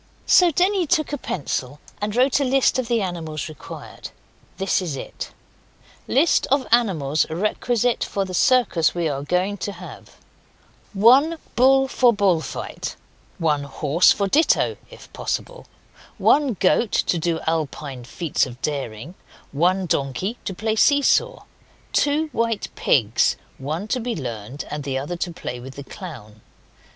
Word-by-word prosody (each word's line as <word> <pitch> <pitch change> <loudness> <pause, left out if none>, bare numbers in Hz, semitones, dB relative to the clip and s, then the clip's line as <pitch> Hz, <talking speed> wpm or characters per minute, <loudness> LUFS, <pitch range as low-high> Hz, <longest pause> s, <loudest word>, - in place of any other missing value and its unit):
So 360 -1 +6
Denny 365 +2 +1
took 310 -2 +1
a - - 0
pencil 140 - -4 0.2
and 205 +1 -2
wrote 255 +3 +3
a - - +1
list 265 0 +2
of 250 - -2
the 230 -3 +1
animals 160 -5 -4
required. 155 -3 -10 0.5
This 195 0 +1
is 165 -6 -3
it: - - -7 0.8
LIST 305 +5 +3
OF 275 -1 +1
ANIMALS 160 - +2
REQUISITE 225 +7 0
FOR 195 -1 -2
THE 185 - -7
CIRCUS 185 -7 +3
WE 170 -2 0
ARE 140 -2 -2
GOING 180 +7 -1
TO 205 - -4
HAVE 180 0 -12 0.8
1 260 +11 +5 0.2
Bull 270 +2 +5
for 250 -2 +4
bull 195 -6 +2
fight. - - -6 0.4
1 155 -5 +1
Horse 150 +4 +3
for 200 - +1
ditto 305 +11 +3
(if - - -15
possible). - - -4 0.5
1 285 -6 +3
Goat 205 +4 +2
to 175 - +1
do 165 0 -1
Alpine 150 -5 -3
feats 155 +3 -1
of 125 -1 -11
daring. 140 -1 -4 0.4
1 180 +6 +1
Donkey 145 - -1
to 190 - -4
play 220 +3 -1
see 285 +5 +4
saw. - - +2 0.5
2 300 +2 +1
White 230 -3 -1
pigs 115 -4 +2 0.2
one 155 +9 -4
to 255 - 0
be 240 0 -3
Learned, 120 -1 -6
and 150 -1 -4
the 135 -1 -2
other 145 +6 -4
to 175 0 -3
play 125 -6 -6
with 130 +2 -10
the 140 - -7
clown. 120 - -10
185 Hz, 150 wpm, -22 LUFS, 150-245 Hz, 0.8 s, So